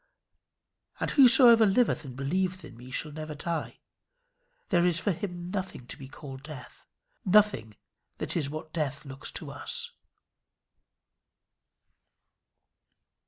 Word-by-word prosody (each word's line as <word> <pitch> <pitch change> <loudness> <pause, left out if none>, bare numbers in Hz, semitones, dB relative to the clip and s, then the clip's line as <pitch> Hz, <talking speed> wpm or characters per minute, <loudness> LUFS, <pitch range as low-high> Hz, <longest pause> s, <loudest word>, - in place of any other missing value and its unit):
"And - - -1
whosoever 245 -4 +8
liveth 220 +1 +2
and 130 -2 -9
believeth 180 +6 -2
in 125 - -12
me 125 +2 -12
shall 150 +4 -4
never 155 0 -7
die." 165 +3 -4 0.9
There 175 -4 +3
is 175 -2 +2
for 200 - 0
him 175 0 -5
nothing 190 -10 -5
to - - -8
be 135 - -10
called 135 -1 -10
death; 140 -3 -11 0.4
nothing 190 - +3 0.4
that - - -4
is 150 -5 -1
what 155 +1 -7
death 150 -3 -3
looks 135 0 -6
to - - -6
us. 475 0 -4
165 Hz, 120 wpm, -28 LUFS, 140-190 Hz, 0.9 s, whosoever